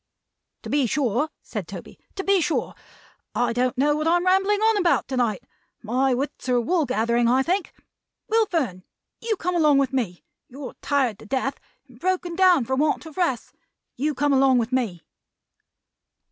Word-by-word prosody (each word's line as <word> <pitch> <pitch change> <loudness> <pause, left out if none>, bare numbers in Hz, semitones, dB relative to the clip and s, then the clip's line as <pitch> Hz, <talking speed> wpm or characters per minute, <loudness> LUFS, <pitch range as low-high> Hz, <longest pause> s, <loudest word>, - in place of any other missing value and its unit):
"To - - -7
be 280 -3 +2
sure," 265 +3 0
said - - -6
Toby. - - -10 0.2
"To 385 - -3
be 395 -2 +3
sure! 325 - -1 0.6
I 240 -1 +1
don't 250 +1 0
know 295 +3 +3
what 305 +1 -1
I 335 - +4
am 350 - -2
rambling 390 +2 +3
on 440 0 +3
about, 355 -4 +2
to 260 - -2
night. 225 -6 0 0.4
My 255 +4 +1
wits 270 0 -4
are 245 -1 +3
wool 320 +4 +1
gathering, 235 -1 +1
I 255 +3 +3
think. 365 +5 -1 0.6
Will 445 0 +2
Fern, 255 - -2 0.4
you 455 -1 -1
come 360 -1 -2
along 305 -4 +4
with 275 -1 +1
me. 215 -10 -2 0.2
You're 270 +1 -8
tired 265 -8 0
to - - -13
death, 270 +3 -2 0.3
and 245 -2 -19
broken 360 0 -1
down 360 -8 +4
for 265 - -1
want 300 +4 0
of 320 - -11
rest. 335 -11 -1 0.4
You 295 +3 -1
come 290 +2 +1
along 265 -1 +4
with 230 0 -1
me." 220 -10 -1
275 Hz, 180 wpm, -24 LUFS, 245-345 Hz, 0.6 s, I